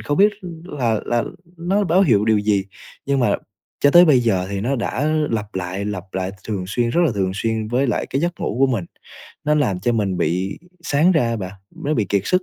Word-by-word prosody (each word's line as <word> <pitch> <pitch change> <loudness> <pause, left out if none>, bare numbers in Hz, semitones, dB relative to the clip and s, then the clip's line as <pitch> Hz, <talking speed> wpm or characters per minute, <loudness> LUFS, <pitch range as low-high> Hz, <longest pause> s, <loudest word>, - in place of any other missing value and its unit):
không 145 - -2
biết 205 +2 +6 0.3
là 120 - -1
là 120 -1 +1 0.3
nó 195 +4 +1
báo 180 +3 +4
hiệu 110 - +3
điều 110 -1 +3
gì. 105 -2 +1 0.4
Nhưng 140 -1 +1
mà 120 - +2 0.4
cho 145 - +5
tới 175 +3 +8
bây 140 -7 +5
giờ 95 -6 +1
thì 100 -1 -2
nó 130 +6 0
đã 125 +4 -1 0.2
lặp 105 -2 -3
lại, 95 +2 -3
lặp 100 -4 -4
lại 95 0 -2 0.2
thường 100 -4 -2
xuyên 115 +3 0
rất 170 - +2
là 120 - 0
thường 95 -2 0
xuyên 110 +1 -2
với 125 +4 +1
lại 120 - -1
cái 135 - -2
giấc 175 +1 -2
ngủ 110 - -2
của 135 - +6
mình. 115 -9 -1 0.6
Nó 150 0 +3
làm 105 -12 +1
cho 120 +5 +1
mình 100 -5 0
bị 90 +5 -1 0.2
sáng 165 +3 +3
ra 160 - +3
á 115 - -1
bạn, 95 -3 -5 0.3
nó 150 - +1
bị 110 -8 0
kiệt 100 0 +1
sức, 185 0 +2
115 Hz, 230 wpm, -21 LUFS, 100-145 Hz, 0.6 s, tới